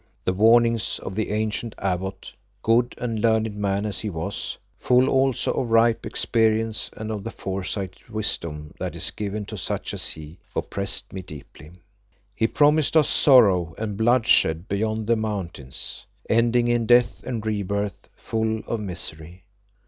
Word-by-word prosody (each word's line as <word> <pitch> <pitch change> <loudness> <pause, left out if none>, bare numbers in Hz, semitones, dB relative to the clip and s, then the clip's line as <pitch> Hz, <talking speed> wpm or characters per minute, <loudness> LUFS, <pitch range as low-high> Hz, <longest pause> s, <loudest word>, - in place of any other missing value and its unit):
The 90 - +1
warnings 115 +2 +4
of 95 - -5
the 110 +2 -2
ancient 110 +2 -2
abbot, 95 0 -3 0.3
good 120 +2 +2
and 115 -3 -3
learned 110 -2 +2
man 100 0 -1
as 105 - -3
he 110 - -3
was, 85 +3 -4 0.2
full 125 +1 +4
also 135 -1 +2
of 120 - -2
ripe 115 0 +3
experience 110 -1 +1
and 110 0 -4
of 105 -2 -4
the 115 - -4
foresighted 95 -1 -5
wisdom 85 -9 -3
that - - -4
is - - 0
given 105 0 -4
to - - -7
such - - -3
as - - -3
he, 80 +2 -8 0.2
oppressed 100 0 -3
me 95 - -5
deeply. 75 -1 -12 0.6
He 110 - +2
promised 150 +4 +3
us 150 - +5
sorrow 95 - +5
and 105 -2 -3
bloodshed 110 -7 +3
beyond 110 +2 -1
the 115 +2 +3
mountains, 95 - -5 0.2
ending 120 +1 +3
in 120 -1 +1
death 120 0 +4
and 115 -4 -4
rebirths 100 -2 -2
full 110 0 -2
of 115 - -2
misery. 85 -2 -5
110 Hz, 150 wpm, -24 LUFS, 95-115 Hz, 0.6 s, us